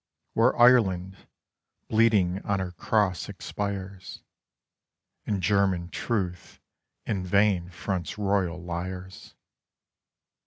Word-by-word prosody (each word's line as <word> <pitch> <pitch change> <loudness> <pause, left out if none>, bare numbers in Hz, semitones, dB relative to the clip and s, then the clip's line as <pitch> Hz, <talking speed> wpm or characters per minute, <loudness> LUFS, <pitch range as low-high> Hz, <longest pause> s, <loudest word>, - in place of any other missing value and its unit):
Where - - +3
Ireland, 95 -7 +4 0.7
bleeding 105 -5 +3
on 100 -1 0
her 95 -1 -3
Cross 95 0 0
expires, 100 -2 -6 1.0
And 100 -3 -1
German 95 -3 +2
truth 95 -7 -3 0.5
in 100 -5 -2
vain 95 -1 +2
fronts 90 -2 -4
royal 95 -4 0
liars. 90 +2 -7
95 Hz, 85 wpm, -27 LUFS, 90-100 Hz, 1.0 s, Ireland